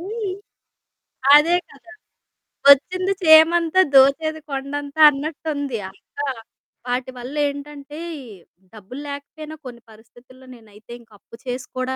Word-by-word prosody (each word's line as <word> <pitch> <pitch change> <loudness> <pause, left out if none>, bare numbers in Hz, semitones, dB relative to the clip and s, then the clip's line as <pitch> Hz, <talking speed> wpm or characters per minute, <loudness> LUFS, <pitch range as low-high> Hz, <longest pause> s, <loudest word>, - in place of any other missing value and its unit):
హ్మ్. 410 +2 -5 1.0
అదే 330 +4 +4
కదా! 345 +5 -17 0.8
వచ్చింది 365 +7 +4
చీమంతా, 330 +2 +5
దోచేది 285 +4 +4
కొండంతా 280 +2 -4
అన్నట్టుంది. 285 -2 -4 0.2
ఇంకా 285 - -7 0.6
వాటివల్లేంటంటే, 280 +4 -5 0.7
డబ్బులు 220 +6 -10
లేకపోయినా 300 +2 -9
కొన్ని 240 -2 -10
పరిస్థితుల్లో 240 +4 -19
నేనైతే 215 -1 -18
ఇంక 230 - -25
అప్పు - - -16
చేసి 250 0 -5
కూడా 255 +1 -2
285 Hz, 95 wpm, -21 LUFS, 255-315 Hz, 1.0 s, చీమంతా